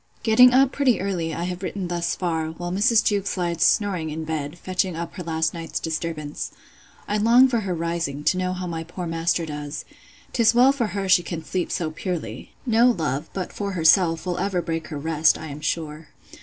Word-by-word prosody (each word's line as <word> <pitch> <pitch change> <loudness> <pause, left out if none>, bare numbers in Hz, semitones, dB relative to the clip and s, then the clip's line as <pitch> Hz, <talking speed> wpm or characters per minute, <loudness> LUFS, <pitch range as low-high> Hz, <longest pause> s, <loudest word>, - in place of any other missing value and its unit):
Getting 245 +3 +7
up 265 +1 +4
pretty 265 -4 +2
early, 180 -4 -2
I 165 +2 -3
have 180 0 -4
written 190 -1 -4
thus 175 -1 -1
far, 165 -3 -1
while 175 +2 -5
Mrs. 215 +4 +3
Jewkes 200 -2 0
lies 170 -2 -2
snoring 185 -5 +2
in 160 +1 -4
bed, 155 0 -4
fetching 185 0 -1
up 170 0 -5
her 185 - -7
last 160 -2 -1
night's 165 -1 -4
disturbance. 155 -2 -4 0.6
I 210 - 0
long 235 +5 +6
for 240 -3 0
her 190 -4 -2
rising, 165 -4 -3
to 185 - +2
know 185 0 -1
how 185 0 -5
my 165 -2 -4
poor 175 +2 -7
master 165 +1 0
does. 150 -1 -6 0.5
'Tis 230 -1 +4
well 255 +3 +6
for 260 -5 -1
her 195 -1 -2
she 185 -1 +5
can 165 -2 -6
sleep 185 -2 -2
so 160 -3 -2
purely. 155 - -5
No 235 0 +4
love, 155 - -1
but 185 -2 -5
for 200 -1 -3
herself, 165 0 +4
will 180 -1 -2
ever 190 -1 0
break 165 -1 -3
her 155 - -6
rest, 160 +1 +2
I 160 - -8
am 145 +1 -8
sure. 155 0 -3
175 Hz, 205 wpm, -23 LUFS, 160-195 Hz, 0.6 s, Getting